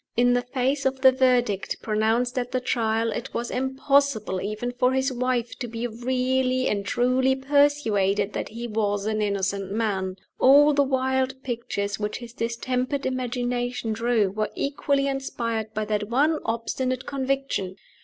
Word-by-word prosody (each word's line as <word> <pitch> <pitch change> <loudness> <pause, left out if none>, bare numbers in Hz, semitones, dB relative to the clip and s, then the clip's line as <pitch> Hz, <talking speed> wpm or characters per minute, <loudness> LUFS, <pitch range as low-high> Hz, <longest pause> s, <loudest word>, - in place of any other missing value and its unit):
In 245 +1 +4
the 245 - +2
face 265 +2 0
of 265 0 -3
the 260 -1 +8
verdict 250 -6 +1
pronounced 225 +4 +1
at 245 0 -4
the 255 - +1
Trial, 225 -2 0
it - - -5
was 235 0 -2
impossible 265 -5 +1
even 215 +4 -3
for 250 +1 +1
his 265 0 +1
wife 250 -1 -1
to 245 - -3
be 230 +1 -4
really 255 +2 0
and 200 -1 0
truly 255 +4 +2
persuaded 265 -8 +2
that - - -3
he 235 +2 -6
was 205 -2 -1
an 215 0 0
innocent 200 -1 -1
man. 195 -4 -1 0.2
All 290 +3 +7
the 285 - +3
wild 265 -1 0
pictures 205 -5 -3
which 210 0 -2
his 240 -1 -10
distempered 255 +4 -2
imagination 245 -2 -2
drew 225 -3 +1
were 215 +1 -2
equally 280 0 0
inspired 230 -5 -3
by 215 0 -1
that 210 0 -2
one 295 +6 +2
obstinate 255 +3 -2
conviction. 270 -8 -2
245 Hz, 155 wpm, -25 LUFS, 220-260 Hz, 0.2 s, the